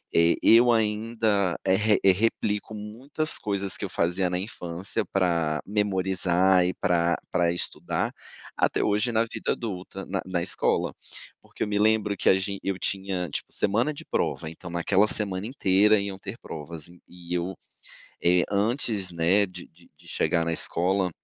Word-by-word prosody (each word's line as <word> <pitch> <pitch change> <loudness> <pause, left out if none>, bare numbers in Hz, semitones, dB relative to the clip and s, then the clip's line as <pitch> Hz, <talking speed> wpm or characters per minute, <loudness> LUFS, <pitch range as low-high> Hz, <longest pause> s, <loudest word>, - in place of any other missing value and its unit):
eh, 85 0 +5
eu 120 +2 +7
ainda, 110 -4 +1
eh, 95 - +3
re 105 +1 +3
replico 105 +1 -1
muitas 125 +9 -1
coisas 100 -2 -1
que - - -7
eu - - -6
fazia 90 +2 0
na 90 0 -1
infância 95 -1 -4
pra 85 -5 0
memorizar 95 -2 +2
e 90 - 0
pra 85 -1 +1
pra 85 -1 +2
estudar, 85 - -2 0.4
até - - +1
hoje 105 +3 +1
na 115 0 +2
vida 115 - -3
adulta, 95 -3 -6
na 95 0 -2
na 90 -2 -2
escola, 90 - 0 0.5
porque - - -17
eu - - -2
me 105 0 -1
lembro 105 -1 +2
que - - +2
a - - +6
gen 100 +1 -2
eu 95 -1 -2
tinha, 95 -1 -2
tipo, - - -5
semana 115 +9 +1
de 145 - -10
prova, 80 - -2
então 85 +2 -10
naquela 95 +4 +2
semana 100 -3 -2
inteira 105 -3 +3
iam 100 -1 -4
ter 100 +4 -7
provas, 80 +2 -8 0.2
e 90 -1 -9
eu, 90 +2 -2 0.7
eh, 90 +1 +4
antes, 105 -2 0
né, 85 +5 +3
de 90 -1 -10
de 85 +1 -23
de 85 +2 -17
chegar 85 +1 +1
na 85 - 0
escola, 90 +3 +1
95 Hz, 165 wpm, -26 LUFS, 90-105 Hz, 0.7 s, eu